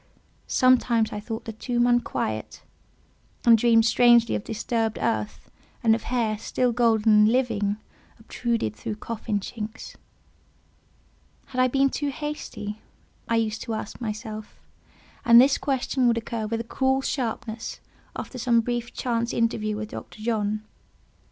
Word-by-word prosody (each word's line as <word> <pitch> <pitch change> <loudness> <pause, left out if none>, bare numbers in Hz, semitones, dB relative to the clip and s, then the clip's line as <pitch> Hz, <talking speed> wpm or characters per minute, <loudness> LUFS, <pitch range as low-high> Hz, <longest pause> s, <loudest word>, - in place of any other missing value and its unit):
Sometimes 240 -3 +3
I 210 - -3
thought 220 +1 -6
the 225 - -5
tomb 240 +2 0
unquiet, 240 - -1 0.8
and 235 -1 +8
dreamed 225 0 +4
strangely 235 0 +5
of - - -2
disturbed 225 0 -2
earth, 220 -2 -2 0.3
and 225 -1 +5
of 225 - 0
hair, 225 -4 0
still 250 +2 0
golden, 225 -2 +3
and 210 +1 +6
living, 220 -5 +1 0.4
obtruded 225 - -2
through 110 - -5
coffin 215 -1 -3
chinks. 220 +2 -7 1.5
Had 255 -1 0
I 255 - +5
been 275 +1 +2
too 290 -1 -2
hasty? 270 -8 -6 0.5
I 230 - +1
used 220 -1 0
to 225 - -3
ask 215 +2 -7
myself; 215 -1 -6 0.6
and 235 0 +8
this 270 +2 +5
question 265 -2 0
would 235 -1 +3
occur 225 -1 -3
with 225 +1 -2
a - - -5
cruel 265 +3 0
sharpness 230 -4 -3 0.4
after 255 - -6
some 235 -1 +3
brief 240 0 -3
chance 235 -1 -1
interview 215 -2 0
with 215 0 -5
Dr. 215 - -9
John. 215 -2 -1
230 Hz, 140 wpm, -25 LUFS, 215-245 Hz, 1.5 s, and